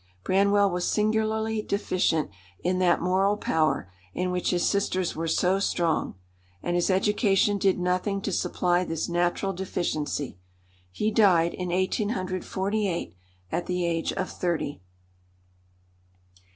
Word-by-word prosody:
Branwell 200 - +3
was 180 0 -1
singularly 220 +1 +1
deficient 180 - 0 0.3
in 185 +1 +1
that 180 -2 +3
moral 190 +3 +2
power 155 - 0 0.2
in 180 0 -1
which 180 0 -1
his 175 -1 +1
sisters 185 -3 0
were 165 +1 -2
so 185 +4 +2
strong, 170 - 0 0.5
and 175 - -1
his 175 +2 +1
education 200 +1 +2
did 195 -1 +2
nothing 180 +3 0
to 200 - -2
supply 180 0 +1
this 165 -3 -3
natural 175 +3 0
deficiency. 155 - -3 0.5
He 210 - -1
died 180 -6 +4
in 180 -1 -4
1848, 190 - -1 0.4
at 175 - -2
the 180 -1 -1
age 165 -1 0
of 185 - -3
thirty. 165 - -2
185 Hz, 125 wpm, -26 LUFS, 175-200 Hz, 0.5 s, died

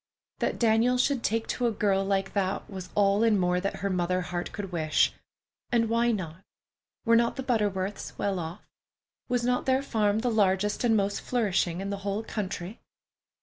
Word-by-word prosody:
That - - -1
Daniel 230 +2 +3
should 260 0 +1
take 225 0 0
to 245 - 0
a - - +1
girl 200 -2 +1
like 195 0 -1
that 195 -1 -1
was 190 -3 -8
all 205 +1 +3
and 220 -3 +4
more 180 0 +1
than 195 - -2
her 200 - -2
mother 180 0 0
heart 175 0 -4
could 200 -3 -6
wish. 155 -3 +2 0.6
And 230 -2 +2
why 235 +1 +2
not? 185 -5 -4 0.6
Were 230 0 +5
not 235 0 +3
the 265 - -4
Butterworths 205 -5 -1
well 195 -2 -1
off? 170 +3 -7 0.6
Was 245 -1 +1
not 250 +1 0
their 260 +1 +2
farm 215 -4 +1
the 245 0 0
largest 205 0 +1
and 225 -2 +4
most 200 0 0
flourishing 195 -7 0
in 195 +1 -3
the 200 - -2
whole 200 +2 -3
country? 200 -2 -5
205 Hz, 185 wpm, -28 LUFS, 190-230 Hz, 0.6 s, Were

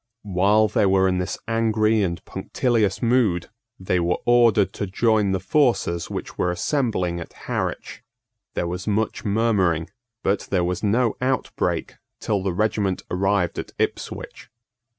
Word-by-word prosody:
While 100 +2 +3
they 105 -1 +2
were 95 0 +4
in 90 -1 +1
this 90 +1 -3
angry 110 -1 +2
and 85 -3 -2
punctilious 115 -6 0
mood, 115 -8 +2 0.3
they 90 -1 0
were 85 +1 +1
ordered 120 -4 +4
to 100 - -3
join 105 0 +2
the 95 - 0
forces 95 - +1
which - - -6
were 90 - +2
assembling 90 - -1
at 85 - -9
Harwich. - - -3 0.5
There - - 0
was 90 +3 -5
much 110 +1 -1
murmuring; 100 -6 +1 0.3
but 100 +1 0
there 90 -3 +1
was 90 0 -2
no 115 +3 +2
outbreak 130 0 -1 0.2
till 105 -3 -1
the 95 0 -1
regiment 100 0 0
arrived 95 -1 +1
at - - -7
Ipswich. - - -4
100 Hz, 145 wpm, -23 LUFS, 90-110 Hz, 0.5 s, were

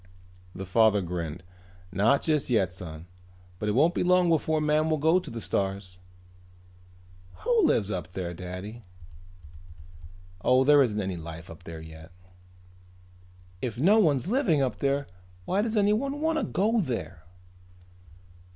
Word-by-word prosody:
The 95 - -6
father 105 +1 +3
grinned. 85 -1 -5 0.5
"Not 105 +9 +2
just 155 -4 0
yet, 95 -7 +1
son, 80 -3 -9 0.5
but 105 - -2
it - - +1
won't 155 +9 +3
be - - -1
long 180 -1 +3
before 160 -1 +1
man 150 +1 +1
will 155 - +1
go 160 +5 +3
to - - -9
the 115 - -6
stars." 95 -3 -3 1.4
"Who 470 -5 +3
lives 105 -2 +1
up 90 -2 -5
there, 90 -2 -4
Daddy?" 90 +6 -8 1.6
"Oh, 130 +1 +4
there 145 +1 +6
isn't 110 -5 +1
any 95 -3 -3
life 80 +1 -9
up 80 +2 -13
there 80 -1 -8
yet." 80 +1 -12 1.5
"If 120 -4 -4
no 195 - +4
one's 145 - +2
living 205 - +2
up 125 -6 -1
there 140 0 0 0.4
why 195 - +1
does 220 0 -1
anyone 215 +8 +1
want 320 +1 +1
to - - -1
go 220 +5 +1
there?" 90 - -5
120 Hz, 145 wpm, -27 LUFS, -, 1.6 s, there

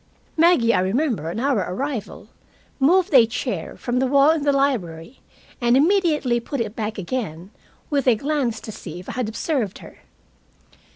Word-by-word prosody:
Maggie, 320 -9 +4
I - - +2
remember, 200 - -1
on 190 - -4
our 265 -2 +1
arrival 260 +2 -5 0.5
moved 355 +6 +3
a 240 -4 +7
chair 225 - -4
from 245 0 -2
the 265 - +1
wall 280 +3 +5
in 320 -1 0
the 285 0 +2
library, 245 - -1 0.4
and 240 +1 +4
immediately 300 -7 +2
put 270 +4 -5
it 225 -2 -3
back 220 0 -4
again, 195 -3 -5 0.4
with 280 -3 0
a 245 - +6
glance 270 -3 -1
to 220 - -8
see 175 -4 -9
if 180 - -11
I - - -3
had 245 -4 -3
observed 225 - -2
her. - - -14
250 Hz, 170 wpm, -22 LUFS, 215-285 Hz, 0.5 s, a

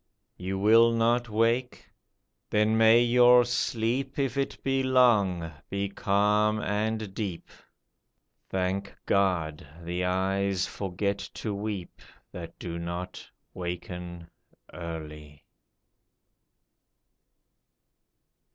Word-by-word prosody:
You 95 +1 -4
will 115 +4 +5
not 120 +1 +1
wake? 115 +3 0 0.6
Then 105 +1 +2
may 115 +1 +6
your 125 0 +6
sleep, 120 +2 -1
If 135 -2 -1
it 140 0 -2
be 135 0 +1
long, 105 -10 +3 0.2
be 100 0 -2
calm 105 +2 +2
and 105 0 -2
deep; 95 -5 -5 1.0
Thank 95 +1 -2
God, 85 -7 0 0.2
the 90 +2 -3
eyes 95 +1 0
forget 100 +1 -3 0.2
to 105 - -3
weep 100 -3 -5 0.3
That 85 -2 -9
do 85 -1 -6
not 85 +1 -6 0.2
waken 90 -1 -6 0.5
early 75 -3 -8
100 Hz, 90 wpm, -27 LUFS, 90-115 Hz, 1.0 s, may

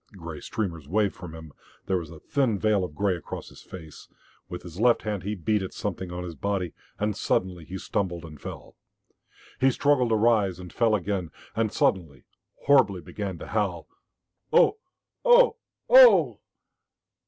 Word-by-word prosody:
Grey 85 -4 -7
streamers 85 -10 -4
waved 100 +4 +1
from 85 -3 -10
him; 80 -2 -11 0.3
there 95 -1 0
was 80 -3 -8
a 80 -1 -11
thin 130 -7 0
veil 105 -1 +2
of 90 -4 -6
grey 100 0 +1
across 85 - -8
his - - -15
face. 80 -5 -11 0.4
With 90 - -7
his 90 +1 -10
left 120 +1 +3
hand 105 -3 -3
he 105 +3 -3
beat 105 +3 0
at 95 - -6
something 95 -3 -4
on 90 0 -5
his 85 -2 -6
body, 90 +1 -2 0.2
and 105 0 -1
suddenly 90 -4 -1
he 95 +4 -6
stumbled 90 -3 -3
and 75 -3 -12
fell. - - -9 0.8
He 135 +1 +4
struggled 130 -2 +2
to 110 - +3
rise, 105 -5 +2
and 90 -1 -10
fell 115 -2 +3
again, 95 -3 -2 0.3
and 110 -2 0
suddenly, 80 -9 0 0.4
horribly, 130 -10 +4
began 95 +2 -5
to - - -8
howl, 100 -6 -1 0.6
"Oh 450 -3 +4 0.4
ohoo, - - +6 0.4
ohooh!" - - +7
95 Hz, 165 wpm, -26 LUFS, 85-110 Hz, 0.8 s, ohooh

